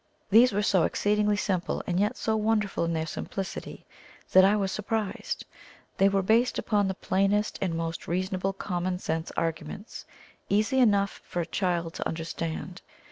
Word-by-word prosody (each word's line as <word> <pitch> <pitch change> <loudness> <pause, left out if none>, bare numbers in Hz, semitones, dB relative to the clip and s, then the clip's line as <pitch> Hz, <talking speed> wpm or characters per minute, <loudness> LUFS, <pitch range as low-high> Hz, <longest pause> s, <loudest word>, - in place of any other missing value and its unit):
These 235 +5 +7
were 205 +1 0
so 190 -3 +3
exceedingly 210 0 +1
simple, 185 -4 -1
and 180 0 0
yet 210 +5 +1
so 220 - 0
wonderful 215 -4 +1
in 165 - -1
their 160 -1 -1
simplicity, 190 +4 -6 0.5
that 190 - +8
I 200 +2 +5
was 195 -2 0
surprised. 210 0 -3 0.5
They 195 +1 +5
were 195 -1 +1
based 230 +5 +3
upon 205 -2 +1
the 190 - -2
plainest 195 +3 +1
and 180 -4 0
most 165 -1 -4
reasonable 185 +2 -1
common 180 -1 -2
sense 160 -2 -3
arguments 165 +5 -4 0.4
easy 215 +6 +2
enough 200 -5 +3
for 175 - -5
a - - -2
child 170 -2 -1
to - - -3
understand. 165 +2 -4
195 Hz, 160 wpm, -27 LUFS, 175-210 Hz, 0.5 s, that